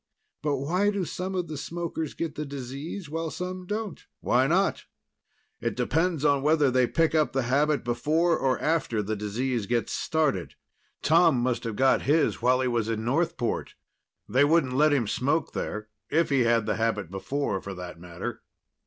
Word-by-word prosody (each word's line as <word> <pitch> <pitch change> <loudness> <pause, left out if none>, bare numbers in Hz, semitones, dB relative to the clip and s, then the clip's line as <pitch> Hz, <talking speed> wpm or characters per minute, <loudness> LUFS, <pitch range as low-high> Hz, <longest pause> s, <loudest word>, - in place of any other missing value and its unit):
But 145 -1 0
why 175 +9 +1
do 200 -3 -1
some 185 +3 -4
of 180 -2 -1
the 155 - -5
smokers 165 -2 -4
get 165 -2 -3
the 150 - -4
disease 140 +6 -6
while 165 +2 -3
some 180 +2 -5
don't?" 210 -2 -4 0.2
"Why 130 +2 +2
not? 190 +6 +1 0.7
It - - -2
depends 160 +2 0
on 140 -2 +3
whether 150 -2 +3
they 130 -1 +3
pick 165 +5 +1
up 155 -2 +2
the 135 -1 +1
habit 145 +4 +2
before 155 +8 +2
or 135 -4 +1
after 145 -9 0
the 110 +2 -2
disease 110 +2 -2
gets 120 -1 0
started. 145 - 0 0.5
Tom 165 -2 +5
must 120 -1 -1
have 115 -2 -3
got 130 +4 +3
his 155 -2 +2
while 125 +2 +3
he 130 - +1
was 115 -2 0
in 110 -1 -2
Northport. 135 -2 -1 0.5
They 130 +3 +3
wouldn't 145 -3 +3
let 150 +3 +4
him 135 -5 +2
smoke 140 +9 0
there 105 0 -4 0.2
if 165 -1 +2
he 130 -3 +3
had 115 -1 +3
the 105 -1 -1
habit 110 -6 -1
before, 95 +1 -2
for 100 -1 -7
that 90 -2 -8
matter." 85 0 -6
140 Hz, 180 wpm, -27 LUFS, 120-160 Hz, 0.7 s, Tom